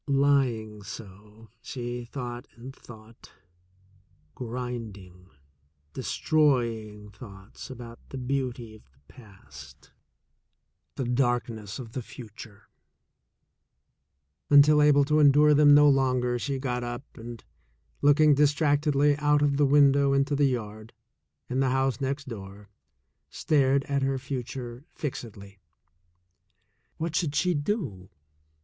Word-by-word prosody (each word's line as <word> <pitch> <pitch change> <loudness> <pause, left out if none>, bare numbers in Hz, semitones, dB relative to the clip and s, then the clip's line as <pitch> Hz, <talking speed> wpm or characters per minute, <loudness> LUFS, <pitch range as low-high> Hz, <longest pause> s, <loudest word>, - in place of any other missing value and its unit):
Lying 135 -7 +1
so, 105 +2 -12
she 120 -1 -6
thought 120 0 -7
and 130 +3 -11
thought 110 -1 -15 0.5
— 95 -5 -35
grinding, 115 -7 -7 0.6
destroy 125 -8 0
ing 105 0 -13
thoughts 100 +1 -12
about 120 -2 -10
the 135 - -7
beauty 125 -3 -3
of 110 - -15
the 65 - -31
past, 70 - -15 1.0
the - - -3
darkness 120 -4 -1
of 120 -4 -9
the 130 - -5
future 110 -3 -12 1.0
— 70 +2 -52
until 150 +1 +6
able 145 -1 +5
to 150 +2 +2
endure 150 +1 +5
them 145 0 +6
no 150 0 +6
longer 130 -3 +1
she 140 +2 -3
got 125 -2 -3
up 120 +2 -5
and, 115 0 -10 0.6
looking 145 +1 +5
distractedly 145 0 +2
out 150 0 +2
of 140 -1 +1
the 145 -1 +3
window 140 -1 +4
into 140 +1 +1
the 145 0 +3
yard 110 -4 -4 0.5
and 130 +1 -1
the 135 - +2
house 135 +1 0
next 140 +1 -3
door, 100 -3 -10 0.6
stared 140 -2 +1
at 140 -1 -2
her 135 0 0
future 125 -1 -6
fixedly. 100 -8 -7 1.4
What 165 0 -4
should 150 -4 -1
she 180 0 +2
do? 145 - -3
125 Hz, 120 wpm, -27 LUFS, 110-140 Hz, 1.4 s, until